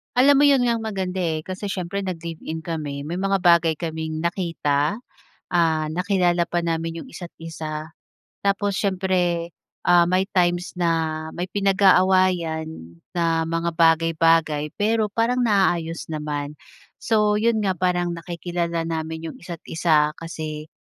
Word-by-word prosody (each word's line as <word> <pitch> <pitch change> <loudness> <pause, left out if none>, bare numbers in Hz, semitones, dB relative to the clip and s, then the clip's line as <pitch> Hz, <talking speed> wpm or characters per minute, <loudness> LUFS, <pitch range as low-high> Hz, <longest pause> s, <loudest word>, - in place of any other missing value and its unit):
Alam 275 +3 +6
mo 290 - +6
yun 280 -3 +5
nga 235 -1 +2
ang 225 - -6
maganda 190 -3 -3
eh. 160 -3 -1
Kasi 185 +4 -6
siyempre 195 0 -3
nag-live-in 165 -2 -5
kami, 150 -4 -4
may 160 +5 -4
mga 195 +1 +1
bagay 170 -2 +5
kaming 160 0 -4
nakita. 170 +1 0 0.5
Ah, 165 -3 +2
nakilala 175 -1 +1
pa 175 -1 -1
namin 165 0 -2
iyong - - -10
isa't 175 -2 -8
isa. 155 -1 -6 0.5
Tapos 200 0 0
siyempre, 180 -3 0 0.3
ah, 175 -1 +5
may 185 +2 +1
times 175 0 0
na 160 -2 0
may 180 +1 -4
pinag-aawayan 185 -4 +3 0.5
na 165 -1 +2
mga 165 +1 0
bagay-bagay. 165 -2 +3
Pero 215 0 +1
parang 235 +4 +1
naaayos 175 -7 +1
naman. 150 -2 -4 0.5
So 210 -2 +2
yun 220 +2 +2
nga, 195 -3 0
parang 175 -1 0
nakikilala 170 0 -3
namin 160 0 -4
yung 160 - -7
isa't 170 -2 -8
isa 150 -2 +2
kasi, 155 -2 -7
170 Hz, 140 wpm, -23 LUFS, 160-190 Hz, 0.5 s, Alam